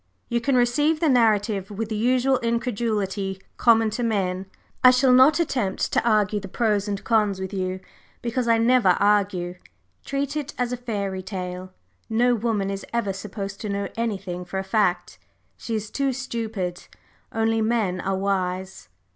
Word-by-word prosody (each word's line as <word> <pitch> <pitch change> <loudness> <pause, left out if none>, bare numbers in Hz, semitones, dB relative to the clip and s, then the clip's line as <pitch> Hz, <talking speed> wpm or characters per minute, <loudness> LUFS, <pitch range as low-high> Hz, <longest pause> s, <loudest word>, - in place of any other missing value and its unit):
You 235 0 0
can 275 +2 +1
receive 295 +6 +2
the 320 - +2
narrative 215 -5 +2
with 210 +1 -4
the 220 - -2
usual 255 +4 +2
incredulity 215 -5 -1 0.2
common 225 -2 +4
to 245 - -3
men; 195 -5 -1 0.4
I 255 - +10
shall 255 0 +4
not 265 +6 +6
attempt 245 - -1
to - - +2
argue 210 -2 +2
the 195 - -8
pros 210 0 0
and 200 -1 -3
cons 210 -4 +2
with 190 +1 -5
you, 185 -1 -2 0.4
because 240 +1 -1
I 230 -1 +4
never 230 -5 +4
argue. 195 -3 +1 0.4
Treat 280 +1 -2
it 295 -1 -4
as 245 0 -1
a - - -2
fairy 200 -6 -3
tale 185 -1 -6 0.4
no 240 +2 +3
woman 215 -4 -1
is 195 0 -5
ever 230 -4 -1
supposed 195 0 -6
to 215 - -4
know 200 0 -2
anything 195 -6 -3
for 180 +2 -6
a 190 - -1
fact, 190 -3 0 0.4
she 230 - -4
is 215 0 -4
too 275 -1 0
stupid. 225 -8 -4 0.4
Only 225 0 +1
men 215 -5 0
are 195 0 -1
wise!" 190 - -2
215 Hz, 165 wpm, -24 LUFS, 195-240 Hz, 0.4 s, I